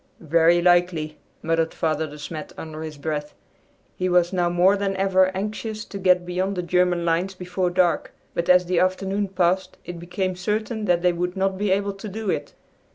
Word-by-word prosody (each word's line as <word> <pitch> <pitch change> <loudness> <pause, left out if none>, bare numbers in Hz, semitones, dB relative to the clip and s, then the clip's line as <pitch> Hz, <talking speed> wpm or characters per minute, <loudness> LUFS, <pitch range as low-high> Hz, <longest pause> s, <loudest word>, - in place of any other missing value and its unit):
"Very 170 +1 +5
likely," 175 -3 +2 0.2
muttered 165 0 0
Father 160 -1 0
De 150 0 -10
Smet 150 +1 -7
under 155 -1 -7
his 155 -2 -7
breath. 150 0 -4 0.6
He 185 0 -1
was 175 0 +3
now 175 -2 +1
more 180 +3 +4
than 200 -1 -1
ever 190 -1 +3
anxious 215 +2 -4
to 200 - -7
get 180 -1 +3
beyond 185 +2 -1
the 180 - -2
German 180 0 +1
lines 175 +3 0
before 180 0 -2
dark, 175 -1 +1 0.2
but 170 - -2
as 180 0 +6
the 175 -1 +1
afternoon 195 +2 0
passed 185 0 0
it 175 -1 -7
became 180 +2 -3
certain 215 +4 -2
that 175 -2 +2
they 180 -1 +4
would 180 +2 -3
not 190 0 +1
be 205 +1 -1
able 200 +1 +1
to 195 +2 -8
do 215 +1 -3
it. - - -4
180 Hz, 190 wpm, -23 LUFS, 170-190 Hz, 0.6 s, as